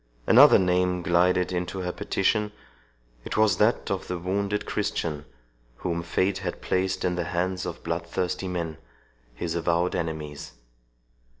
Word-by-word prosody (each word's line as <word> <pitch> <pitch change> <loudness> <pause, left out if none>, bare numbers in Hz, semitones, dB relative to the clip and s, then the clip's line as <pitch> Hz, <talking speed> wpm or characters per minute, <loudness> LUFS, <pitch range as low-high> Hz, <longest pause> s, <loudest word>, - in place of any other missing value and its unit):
Another - - +8
name 90 -1 +1
glided 90 +1 +2
into 90 +1 -3
her 90 0 -2
petition—it - - -3
was 110 -4 +4
that 110 +1 +2
of 95 -1 -2
the 90 - -3
wounded 100 +3 -1
Christian, 75 -2 -2 0.5
whom 85 +4 -2
fate 95 +3 0
had - - -4
placed 95 0 -1
in 90 - +1
the 90 -1 -2
hands 90 +2 -2
of - - -7
bloodthirsty 85 +2 -2
men, 85 -4 -3 0.6
his 85 +5 -3
avowed 85 +1 +1
enemies. 75 -3 -4
90 Hz, 130 wpm, -26 LUFS, 85-95 Hz, 0.6 s, Another